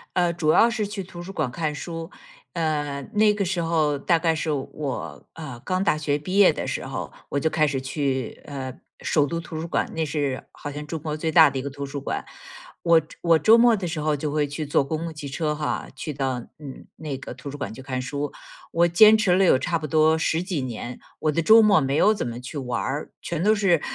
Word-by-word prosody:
呃， 175 Hz, -1 st, +3 dB
主 160 Hz, -2 st, +1 dB
要 230 Hz, -, +6 dB
是 220 Hz, -3 st, -2 dB
去 205 Hz, -1 st, -5 dB
图 175 Hz, -1 st, -10 dB
书 180 Hz, +3 st, -7 dB
馆 150 Hz, -8 st, -1 dB
看 155 Hz, +1 st, -2 dB
书。 165 Hz, +1 st, -6 dB, 0.4 s
嗯， 150 Hz, -4 st, -2 dB
那 210 Hz, 0 st, +4 dB
个 205 Hz, -1 st, -1 dB
时 180 Hz, -1 st, -1 dB
候 155 Hz, -3 st, +1 dB
大 170 Hz, +4 st, +3 dB
概 165 Hz, 0 st, +1 dB
是 160 Hz, 0 st, -3 dB
我， 135 Hz, -, -4 dB
呃， 140 Hz, -7 st, -8 dB
刚 185 Hz, 0 st, 0 dB
大 155 Hz, -, +2 dB
学 150 Hz, -1 st, 0 dB
毕 185 Hz, +6 st, -3 dB
业 200 Hz, -2 st, +7 dB
的 -, -, -4 dB
时 -, -, -3 dB
候， -, -, -5 dB, 0.2 s
我 -, -, -2 dB
就 160 Hz, +3 st, +1 dB
开 155 Hz, -1 st, +2 dB
始 135 Hz, -2 st, -2 dB
去， 130 Hz, -2 st, -2 dB
呃， 135 Hz, -3 st, -6 dB, 0.3 s
首 145 Hz, -2 st, +2 dB
都 165 Hz, +3 st, -3 dB
图 165 Hz, -2 st, -7 dB
书 165 Hz, -, -4 dB
馆， -, -, -1 dB
那 160 Hz, -1 st, -1 dB
是 140 Hz, -3 st, -2 dB
好 145 Hz, -, -7 dB
像 150 Hz, +1 st, -7 dB
中 165 Hz, -, -3 dB
国 155 Hz, 0 st, -3 dB
最 160 Hz, +1 st, -2 dB
大 160 Hz, -1 st, +7 dB
的 135 Hz, -, -4 dB
一 -, -, -2 dB
个 140 Hz, -, -4 dB
图 140 Hz, +1 st, -6 dB
书 140 Hz, +1 st, -5 dB
馆。 140 Hz, -, -3 dB, 0.6 s
我 170 Hz, -1 st, +5 dB
周 155 Hz, -, -17 dB
我 165 Hz, -2 st, +5 dB
周 220 Hz, +6 st, +6 dB
末 235 Hz, -1 st, +6 dB
的 190 Hz, -3 st, -4 dB
时 160 Hz, -2 st, -3 dB
候 150 Hz, 0 st, +1 dB
就 145 Hz, +1 st, -3 dB
会 150 Hz, -1 st, +1 dB
去 145 Hz, +2 st, -4 dB
坐 145 Hz, -1 st, +2 dB
公 155 Hz, +2 st, -3 dB
共 165 Hz, 0 st, -5 dB
汽 150 Hz, -2 st, -7 dB
车 150 Hz, +2 st, -1 dB
哈， 150 Hz, 0 st, -3 dB
去 150 Hz, -, -4 dB
到 135 Hz, -2 st, -1 dB, 0.2 s
嗯， 140 Hz, -4 st, -9 dB
那 150 Hz, -4 st, -5 dB
个 130 Hz, -, -8 dB
图 140 Hz, -, -9 dB
书 145 Hz, -, -7 dB
馆 145 Hz, -, -5 dB
去 130 Hz, -, -10 dB
看 130 Hz, -1 st, -3 dB
书， 140 Hz, +3 st, -3 dB, 0.4 s
我 170 Hz, +1 st, +3 dB
坚 215 Hz, +6 st, +7 dB
持 195 Hz, -5 st, +3 dB
了 195 Hz, -, +4 dB
有 175 Hz, -, +5 dB
差 170 Hz, +4 st, 0 dB
不 155 Hz, -, -6 dB
多 155 Hz, +1 st, +4 dB
十 160 Hz, +1 st, 0 dB
几 180 Hz, -5 st, -2 dB
年。 120 Hz, -1 st, -5 dB, 0.2 s
我 155 Hz, -, +1 dB
的 165 Hz, -, 0 dB
周 220 Hz, +7 st, +7 dB
末 205 Hz, -6 st, +5 dB
没 135 Hz, +1 st, 0 dB
有 215 Hz, -, +5 dB
怎 215 Hz, -, -3 dB
么 120 Hz, 0 st, -5 dB
去 125 Hz, +5 st, -7 dB
玩 125 Hz, -3 st, -2 dB
儿， 145 Hz, +3 st, -3 dB
全 170 Hz, -1 st, -3 dB
都 215 Hz, +2 st, +5 dB
是 185 Hz, -6 st, +3 dB
155 Hz, 265 characters per minute, -24 LUFS, 140-170 Hz, 0.6 s, 业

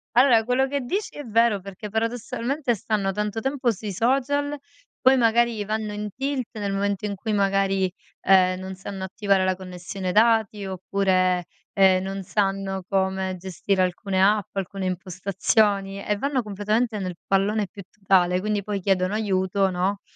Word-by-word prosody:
Vabbè 245 Hz, -3 st, +6 dB
quello 250 Hz, +3 st, +2 dB
che 280 Hz, +1 st, -2 dB
dici 375 Hz, -, -3 dB
è 290 Hz, -, -6 dB
vero 230 Hz, -2 st, +2 dB
perché 195 Hz, +2 st, -8 dB
paradossalmente 240 Hz, +4 st, -1 dB
stanno 200 Hz, -1 st, -1 dB
tanto 210 Hz, +2 st, -2 dB
tempo 270 Hz, -1 st, 0 dB
sui 210 Hz, -1 st, -5 dB
social, 280 Hz, +7 st, 0 dB, 0.4 s
poi 260 Hz, +1 st, +5 dB
magari 230 Hz, -2 st, +2 dB
vanno 215 Hz, 0 st, -3 dB
in 210 Hz, 0 st, -4 dB
tilt 270 Hz, -2 st, -2 dB
nel 200 Hz, -1 st, -2 dB
momento 200 Hz, 0 st, -1 dB
in 205 Hz, -1 st, -2 dB
cui 215 Hz, +3 st, -4 dB
magari, 195 Hz, -2 st, +1 dB, 0.3 s
ehm, 185 Hz, -1 st, +4 dB
non 190 Hz, 0 st, -6 dB
sanno 190 Hz, 0 st, -7 dB
attivare 195 Hz, 0 st, +1 dB
la 185 Hz, 0 st, +2 dB
connessione 185 Hz, +1 st, -6 dB
dati 220 Hz, -1 st, +3 dB
oppure, 185 Hz, -1 st, +1 dB, 0.3 s
ehm, 190 Hz, -2 st, +5 dB
non 195 Hz, 0 st, -4 dB
sanno 195 Hz, -1 st, -1 dB
come 190 Hz, -1 st, 0 dB
gestire 190 Hz, +1 st, -1 dB
alcune 185 Hz, +1 st, -1 dB
app, 200 Hz, 0 st, +2 dB
alcune 195 Hz, 0 st, -3 dB
impostazioni, 195 Hz, +2 st, 0 dB
e 210 Hz, -, -1 dB
vanno 270 Hz, +3 st, -1 dB
completamente 215 Hz, +2 st, -1 dB
nel 185 Hz, -2 st, -4 dB
pallone 200 Hz, +1 st, +1 dB
più 200 Hz, -, -10 dB
totale. 185 Hz, -3 st, +2 dB
Quindi 210 Hz, 0 st, -1 dB
poi 205 Hz, -1 st, -3 dB
chiedono 185 Hz, 0 st, +1 dB
aiuto, 195 Hz, -2 st, +1 dB
no, 190 Hz, +2 st, -1 dB
200 Hz, 155 wpm, -24 LUFS, 190-225 Hz, 0.4 s, Vabbè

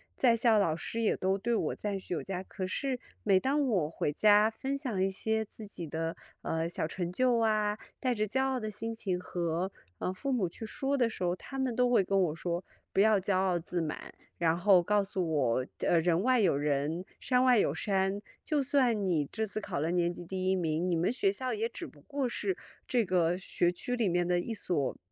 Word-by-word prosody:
在 240 Hz, -3 st, +4 dB
校 225 Hz, -2 st, +4 dB
老 165 Hz, -6 st, +2 dB
师 230 Hz, +7 st, -4 dB
也 220 Hz, -, +2 dB
都 190 Hz, +1 st, 0 dB
对 235 Hz, +2 st, 0 dB
我 -, -, -1 dB
赞 205 Hz, -2 st, -3 dB
许 185 Hz, -, -6 dB
有 170 Hz, -, -1 dB
加。 190 Hz, -1 st, -4 dB
可 185 Hz, -1 st, -5 dB
是 260 Hz, +4 st, -2 dB, 0.2 s
每 195 Hz, -3 st, +4 dB
当 280 Hz, +4 st, +1 dB
我 180 Hz, -10 st, +1 dB
回 150 Hz, -2 st, -2 dB
家 210 Hz, +5 st, +5 dB
分 270 Hz, +5 st, -3 dB
享 240 Hz, -10 st, -2 dB
一 195 Hz, -, +3 dB
些 220 Hz, +3 st, -1 dB
自 215 Hz, 0 st, -11 dB
己 175 Hz, -5 st, -7 dB
的， 165 Hz, +2 st, -3 dB, 0.3 s
呃， 165 Hz, +1 st, -1 dB
小 165 Hz, -2 st, -2 dB
成 175 Hz, 0 st, -3 dB
就 245 Hz, +2 st, +2 dB
啊， 215 Hz, -1 st, +1 dB, 0.2 s
带 255 Hz, -1 st, +1 dB
着 215 Hz, -2 st, -1 dB
骄 265 Hz, +5 st, +1 dB
傲 265 Hz, -1 st, 0 dB
的 215 Hz, -, -4 dB
心 225 Hz, +2 st, -4 dB
情 190 Hz, -5 st, -2 dB
和， 175 Hz, +1 st, -2 dB, 0.3 s
呃， 185 Hz, -, -2 dB
父 270 Hz, +9 st, -3 dB
母 225 Hz, -8 st, +1 dB
去 170 Hz, -, -9 dB
说 275 Hz, +4 st, -1 dB
的 240 Hz, -4 st, +2 dB
时 185 Hz, -, -6 dB
候， 175 Hz, 0 st, +1 dB
他 270 Hz, +8 st, -9 dB
们 260 Hz, -3 st, 0 dB
都 250 Hz, 0 st, +3 dB
会 235 Hz, -5 st, +4 dB
跟 195 Hz, +1 st, +2 dB
我 160 Hz, -4 st, +1 dB
说 175 Hz, +2 st, -3 dB, 0.3 s
“不 -, -, +1 dB
要 215 Hz, 0 st, +5 dB
骄 190 Hz, +1 st, 0 dB
傲 185 Hz, -1 st, +2 dB
自 175 Hz, +1 st, -3 dB
满”。 155 Hz, -1 st, -5 dB, 0.2 s
然 165 Hz, -1 st, +2 dB
后 185 Hz, 0 st, +5 dB
告 205 Hz, +3 st, +2 dB
诉 190 Hz, -3 st, -2 dB
我， 130 Hz, -4 st, +1 dB, 0.2 s
呃， 170 Hz, -, +4 dB
人 170 Hz, 0 st, +2 dB
外 255 Hz, -1 st, +4 dB
有 175 Hz, -8 st, +3 dB
人， 150 Hz, +5 st, -1 dB
山 250 Hz, 0 st, +2 dB
外 250 Hz, -4 st, +5 dB
有 -, -, +2 dB
山， 195 Hz, 0 st, 0 dB, 0.2 s
就 300 Hz, -3 st, +1 dB
算 255 Hz, -6 st, +2 dB
你 155 Hz, -6 st, +1 dB
这 220 Hz, 0 st, -1 dB
次 215 Hz, +1 st, -4 dB
考 -, -, -3 dB
了 160 Hz, +3 st, 0 dB
年 175 Hz, -1 st, +2 dB
级 175 Hz, 0 st, -8 dB
第 185 Hz, +1 st, -2 dB
1 190 Hz, -, +3 dB
名， 165 Hz, 0 st, 0 dB
你 175 Hz, -, +1 dB
们 170 Hz, +7 st, +1 dB
学 200 Hz, -6 st, +2 dB
校 255 Hz, +5 st, -2 dB
也 450 Hz, +2 st, -1 dB
只 -, -, -7 dB
不 -, -, -14 dB
过 280 Hz, -3 st, -2 dB
是 375 Hz, +10 st, -2 dB, 0.3 s
这 240 Hz, -4 st, +2 dB
个 175 Hz, -1 st, +2 dB
学 175 Hz, -1 st, 0 dB
区 245 Hz, +7 st, -3 dB
里 225 Hz, -6 st, +1 dB
面 175 Hz, 0 st, +1 dB
的 175 Hz, 0 st, +2 dB
一 230 Hz, -, -4 dB
所， 170 Hz, -9 st, -1 dB
195 Hz, 245 characters per minute, -31 LUFS, 175-230 Hz, 0.3 s, 家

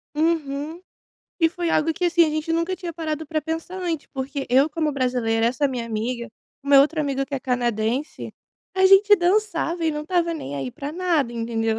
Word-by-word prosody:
Uhum. 310 Hz, 0 st, -1 dB, 0.6 s
E 325 Hz, -, +5 dB
foi 345 Hz, 0 st, -3 dB
algo 325 Hz, +1 st, +2 dB
que, 360 Hz, -, -3 dB
assim, 345 Hz, -1 st, +4 dB
a -, -, 0 dB
gente 310 Hz, +1 st, -2 dB
nunca 335 Hz, +3 st, 0 dB
tinha 350 Hz, -1 st, -6 dB
parado 315 Hz, -1 st, -4 dB
pra 310 Hz, +1 st, -1 dB
pensar 325 Hz, +4 st, -5 dB
antes, 335 Hz, -4 st, -3 dB
porque 270 Hz, +1 st, -4 dB
eu 270 Hz, +4 st, +5 dB
como 310 Hz, -1 st, -1 dB
brasileira, 245 Hz, -4 st, +1 dB
essa 275 Hz, +4 st, +1 dB
minha 245 Hz, -3 st, -4 dB
amiga, 235 Hz, +2 st, -3 dB, 0.3 s
uma 280 Hz, -1 st, +6 dB
outra 310 Hz, +3 st, +2 dB
amiga 275 Hz, -2 st, -1 dB
que 280 Hz, -, -6 dB
é 265 Hz, -, -3 dB
canadense, 245 Hz, +2 st, -2 dB, 0.4 s
a 380 Hz, 0 st, +3 dB
gente 395 Hz, +2 st, +7 dB
dançava 350 Hz, -3 st, 0 dB
e 320 Hz, -, +2 dB
não 300 Hz, 0 st, -4 dB
estava 340 Hz, +1 st, 0 dB
nem 145 Hz, -, -6 dB
aí 135 Hz, -2 st, -4 dB
para 280 Hz, -, -6 dB
nada, 330 Hz, -8 st, 0 dB
entendeu? 225 Hz, -1 st, -1 dB
300 Hz, 195 wpm, -23 LUFS, 255-335 Hz, 0.6 s, gente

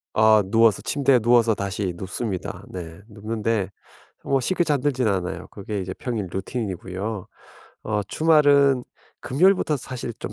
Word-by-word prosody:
어 110 Hz, -1 st, +5 dB
누워서 110 Hz, +1 st, +3 dB
침대에 140 Hz, -2 st, +3 dB
누워서 115 Hz, -1 st, +4 dB
다시 100 Hz, -2 st, -3 dB
눕습니다. 95 Hz, +2 st, -5 dB
네. 85 Hz, -1 st, -8 dB
눕는데 110 Hz, -1 st, -2 dB, 0.5 s
뭐 135 Hz, -1 st, +1 dB
쉽게 175 Hz, +7 st, 0 dB
잠들지는 135 Hz, -6 st, +1 dB
않아요. 90 Hz, -2 st, -4 dB
그게 100 Hz, 0 st, -5 dB
이제 95 Hz, 0 st, -4 dB
평일 110 Hz, -2 st, -4 dB
루틴이고요. 95 Hz, 0 st, -4 dB, 0.6 s
어 105 Hz, -1 st, -1 dB
주말은 140 Hz, 0 st, +4 dB, 0.4 s
금요일부터 170 Hz, +2 st, +2 dB
사실 125 Hz, -2 st, -6 dB
좀 -, -, -5 dB
110 Hz, 310 characters per minute, -23 LUFS, 95-130 Hz, 0.6 s, 어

